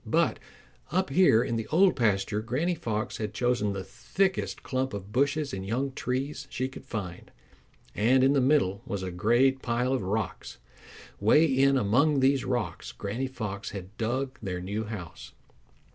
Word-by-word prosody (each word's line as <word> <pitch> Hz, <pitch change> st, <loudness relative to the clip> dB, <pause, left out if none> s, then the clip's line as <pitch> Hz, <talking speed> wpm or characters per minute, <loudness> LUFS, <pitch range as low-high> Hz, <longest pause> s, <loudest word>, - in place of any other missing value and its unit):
But -, -, +1 dB, 0.5 s
up 185 Hz, -3 st, 0 dB
here 135 Hz, -8 st, +5 dB
in 115 Hz, -2 st, -2 dB
the 110 Hz, -1 st, -4 dB
Old 180 Hz, +5 st, +4 dB
Pasture 105 Hz, -2 st, +1 dB
Granny 135 Hz, +11 st, -1 dB
Fox 115 Hz, -6 st, -3 dB
had 105 Hz, -1 st, -4 dB
chosen 120 Hz, -4 st, +1 dB
the 95 Hz, -1 st, -4 dB
thickest 190 Hz, -, -1 dB
clump 130 Hz, -3 st, -2 dB
of 100 Hz, 0 st, -8 dB
bushes 140 Hz, +3 st, +1 dB
and 95 Hz, -, -4 dB
young 125 Hz, +7 st, -1 dB
trees 135 Hz, +3 st, -3 dB
she 130 Hz, 0 st, -2 dB
could 130 Hz, -, -11 dB
find, 95 Hz, -8 st, -6 dB, 0.6 s
and 125 Hz, +5 st, +3 dB
in 135 Hz, +1 st, +5 dB
the 140 Hz, -, +3 dB
middle 125 Hz, -8 st, +2 dB
was 100 Hz, -1 st, -3 dB
a 95 Hz, -, -4 dB
great 120 Hz, +9 st, +2 dB
pile 125 Hz, +2 st, 0 dB
of 130 Hz, -, 0 dB
rocks. 100 Hz, +1 st, -3 dB, 0.6 s
Way 130 Hz, +10 st, +5 dB
in 135 Hz, -1 st, +3 dB
among 130 Hz, +7 st, +3 dB
these 135 Hz, 0 st, +3 dB
rocks 115 Hz, -9 st, -3 dB
Granny 115 Hz, +7 st, -3 dB
Fox 105 Hz, -6 st, -5 dB
had 95 Hz, +2 st, -10 dB
dug 130 Hz, +4 st, -2 dB
their 95 Hz, -4 st, -3 dB
new 100 Hz, +5 st, -3 dB
house. 85 Hz, -8 st, -8 dB
120 Hz, 165 wpm, -28 LUFS, 100-135 Hz, 0.6 s, here